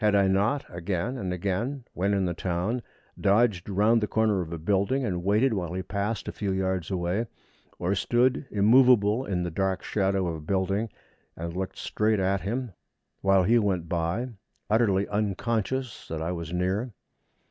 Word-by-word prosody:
Had 105 -1 +3
I 100 -1 +4
not 105 +9 +1
again 90 +7 -2
and 95 -8 -3
again, 100 +9 -2
when 100 +3 +1
in 95 -1 +1
the 90 - -1
town, 90 +8 -2 0.4
dodged 100 -2 +2
round 105 +4 +3
the 105 - 0
corner 110 -3 +2
of 85 -2 -6
a 85 - -3
building, 100 - +1
and 90 -5 -2
waited 110 +6 +3
while 90 -4 -3
he 95 +1 -3
passed 100 +3 -3
a - - -2
few 100 -2 -3
yards 95 -2 -1
away, 95 +4 -1 0.5
or 90 +3 0
stood 125 +7 +1
immovable 115 +1 +5
in 90 -3 -1
the 85 - -3
dark 95 +2 -1
shadow 95 -2 0
of 85 -2 -2
a - - -9
building, 95 +6 0 0.5
and 85 +1 -5
looked 95 0 -4
straight 110 -1 0
at 95 0 +1
him 120 +4 -3 0.5
while 95 -1 +4
he 115 +6 +4
went 95 -6 0
by 85 +9 -1 0.4
utterly 100 -3 +3
unconscious 110 +4 -2
that 80 - -4
I 80 +2 -2
was 85 -2 -5
near? 95 +7 -1
100 Hz, 175 wpm, -27 LUFS, 90-110 Hz, 0.5 s, immovable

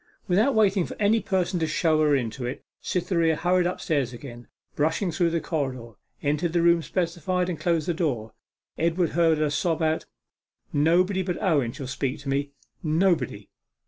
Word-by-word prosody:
Without 215 +9 +3
waiting 200 -3 +3
for - - -7
any 210 +2 +3
person 185 -2 0
to 160 - 0
show 155 -1 +2
her 150 -2 +4
into 125 0 -3
it, 125 +2 -4 0.2
Cytherea 170 -3 +1
hurried 180 +2 +2
upstairs 145 -8 -1
again, 120 -1 -10 0.3
brushed 160 +6 +1
through 170 +2 +2
the 165 0 0
corridor, 130 -8 -3 0.3
entered 150 +3 0
the 170 -1 +2
room 170 0 +5
specified, 180 +3 -1
and 170 -4 -4
closed 165 0 0
the 175 - +1
door. 130 -10 -2 0.5
Edward 170 +1 +1
heard 165 -2 +3
her 150 -1 0
sob 160 +2 0
out 160 0 0 0.7
'Nobody 180 +6 +3
but 180 -2 -3
Owen 150 - +1
shall 135 +2 -7
speak 135 +1 -3
to 140 - -6
me 140 +1 0 0.3
nobody! 155 - 0
165 Hz, 170 wpm, -25 LUFS, 145-180 Hz, 0.7 s, room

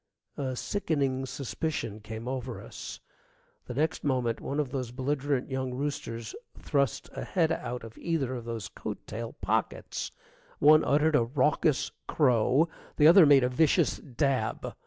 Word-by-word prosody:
A 130 -2 -3
sickening 135 -6 -1
suspicion 130 -4 -3
came 110 +2 -7
over 130 -2 -4
us. - - -8 0.7
The 125 - -5
next 155 +4 0
moment 125 -5 0
one 140 - -3
of 140 -4 -1
those 130 -3 -3
belligerent 135 +1 -1
young 130 -1 -2
roosters 115 -5 -4 0.2
thrust 140 -4 0
a - - -5
head 165 -4 +1
out 125 -7 -3
of 115 -1 -11
either 155 -7 -1
of 120 -2 -6
those 115 -3 -4
coat - - -7
tail 115 +1 -6
pockets. - - -1 0.5
One 155 +2 +6
uttered 150 +3 +3
a 120 - +5
raucous 145 +3 +1 0.2
crow, 130 +2 +3 0.3
the 150 - +5
other 170 0 +9
made 140 -2 +7
a - - +3
vicious 150 +4 +3
dab. 130 -3 -1
135 Hz, 150 wpm, -29 LUFS, 125-150 Hz, 0.7 s, other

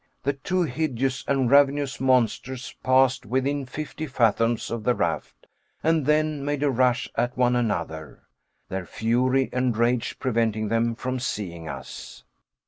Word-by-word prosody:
The 140 - +1
two 180 +7 -1
hideous 135 -3 -1
and 135 -2 +2
ravenous 140 -2 +3
monsters 130 0 +1
passed 130 0 +3
within 130 +4 -1
fifty 155 +3 -5
fathoms 115 -2 +1
of 115 -2 -3
the 125 +1 +2
raft, - - -3 0.4
and 160 -3 +2
then 150 -1 +2
made 145 0 -1
a 145 - +3
rush 125 0 +2
at 120 +2 -1
one 125 -1 +3
another 85 -10 -3 0.4
their 95 -1 -5
fury 125 +4 +1
and 125 -3 0
rage 120 0 +1
preventing 110 -4 0
them 115 +1 +1
from 130 +2 -3
seeing 85 -9 -4
us. 60 -1 -9
125 Hz, 140 wpm, -25 LUFS, 115-135 Hz, 0.4 s, ravenous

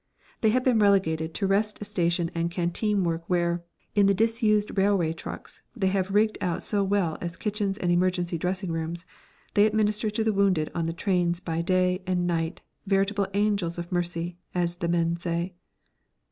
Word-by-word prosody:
They 220 - +3
have 250 +3 +2
been 250 -4 +3
relegated 165 -6 +2
to 200 - -1
rest 210 +2 0
station 170 -4 0
and 170 0 -1
canteen 185 +4 0
work 165 -1 -1
where, 175 -1 +1 0.3
in 200 -1 +4
the 200 - +4
disused 220 -1 +2
railway 190 -5 +2
trucks 165 - -8
they 195 -5 +1
have 190 0 0
rigged 215 +2 +2
out 175 -2 -1
so 205 -2 +1
well 195 -5 0
as 170 0 -5
kitchens 205 -2 -2
and 175 -3 0
emergency 175 -1 +1
dressing 185 +1 -2
rooms, 165 +1 -4 0.5
they 205 +1 +5
administer 215 0 +1
to 215 +1 -1
the 220 -1 +1
wounded 190 -6 +2
on 165 -1 -1
the - - -1
trains 175 -1 0
by 165 -2 -2
day 185 +1 +1
and 180 -1 +1
night, 165 0 -1 0.3
veritable 195 0 +1
angels 200 -5 +1
of 175 +1 -6
mercy, 175 -1 -2 0.2
as 175 -1 0
the 170 - -2
men 170 0 +1
say. 170 +1 -2
185 Hz, 175 wpm, -26 LUFS, 170-205 Hz, 0.5 s, they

